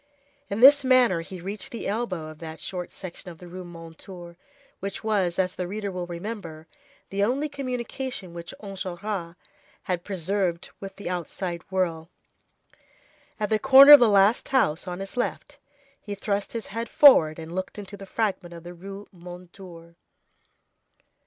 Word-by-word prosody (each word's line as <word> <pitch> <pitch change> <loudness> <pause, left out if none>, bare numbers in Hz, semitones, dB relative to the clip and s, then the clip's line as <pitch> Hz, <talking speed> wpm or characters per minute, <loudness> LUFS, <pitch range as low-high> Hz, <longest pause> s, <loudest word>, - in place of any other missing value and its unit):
In 200 +3 -2
this 285 +2 +9
manner 250 -9 +4
he 180 +2 -9
reached 195 +4 -6
the 235 - -6
elbow 195 -7 -3
of 155 -1 -12
that 160 -1 -8
short 180 -2 -5
section 185 -1 -9
of 170 - -11
the 180 0 -12
Rue 180 +1 -8
Mondétour 170 +1 -10 0.4
which 195 +2 -5
was, 195 -6 0
as 180 -1 0
the 180 - -3
reader 205 +1 -4
will 180 -1 -5
remember, 170 -3 -7 0.5
the 200 +1 0
only 265 +8 +1
communication 255 - -5
which 170 0 -7
Enjolras 190 -2 -5 0.5
had 180 -2 -2
preserved 185 -2 -2
with 195 -1 -8
the 200 - -8
outside 175 0 -4
world. 170 -4 -1 1.3
At 210 0 -2
the 215 - +3
corner 270 +3 +9
of 290 - +13
the 240 - +5
last 200 +3 +4
house, 180 - +1
on 180 +1 -5
his 195 +5 -8
left, 245 - -3 0.4
he 205 -1 -6
thrust 200 0 -2
his 230 -1 -4
head 230 +1 -3
forward, 160 - +7
and 165 0 -8
looked 185 +3 -4
into 205 0 -7
the 195 -1 -11
fragment 190 -5 -2
of 170 - -11
the 175 +1 -9
Rue 195 +3 -9
Mondétour. 175 -1 -12
190 Hz, 160 wpm, -25 LUFS, 175-215 Hz, 1.3 s, of